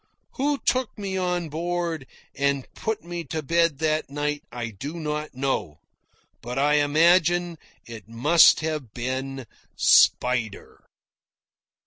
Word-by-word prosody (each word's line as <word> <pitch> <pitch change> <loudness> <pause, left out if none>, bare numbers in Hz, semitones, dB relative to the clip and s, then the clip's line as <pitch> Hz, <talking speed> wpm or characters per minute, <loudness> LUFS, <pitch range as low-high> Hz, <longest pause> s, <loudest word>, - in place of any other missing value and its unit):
Who 285 +1 -1
took 255 -3 -1
me 195 -2 -4
on 180 -3 -1
board 170 -2 -3 0.3
and 140 -1 -1
put 220 -1 -4
me 175 0 -5
to 155 -1 -4
bed 165 0 +2
that 155 0 -1
night 145 +1 -2
I 120 -1 -5
do 140 - -7
not 150 -2 -4
know, 130 - -2 0.6
but 120 +2 -6
I 145 +2 +3
imagine 170 +3 +3 0.3
it 115 -2 -10
must 150 +9 +5
have 155 -8 -4
been 130 +2 -4 0.3
Spider. 125 -4 +2
150 Hz, 120 wpm, -24 LUFS, 135-170 Hz, 0.6 s, must